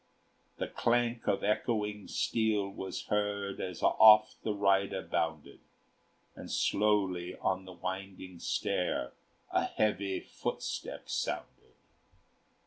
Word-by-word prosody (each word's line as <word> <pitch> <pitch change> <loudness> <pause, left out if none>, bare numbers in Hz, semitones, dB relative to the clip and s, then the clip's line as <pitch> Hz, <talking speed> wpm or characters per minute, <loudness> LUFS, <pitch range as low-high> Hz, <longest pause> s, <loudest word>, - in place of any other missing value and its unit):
The - - -2
clank 120 0 0
of 100 - +1
echoing 105 -1 -1
steel 110 -3 +1
was 95 -1 -5
heard 105 -2 -1
As 90 -2 -5
off 110 0 +7
the 110 - -1
rider 100 -1 +2
bounded; 80 -2 -2 0.8
And - - -9
slowly 95 -4 +1
on 95 0 -1
the 90 - -10
winding 95 0 -6
stair 60 - -1 0.4
A - - +2
heavy 100 -2 0
footstep - - -5
sounded. - - -4
100 Hz, 105 wpm, -32 LUFS, 95-105 Hz, 0.8 s, off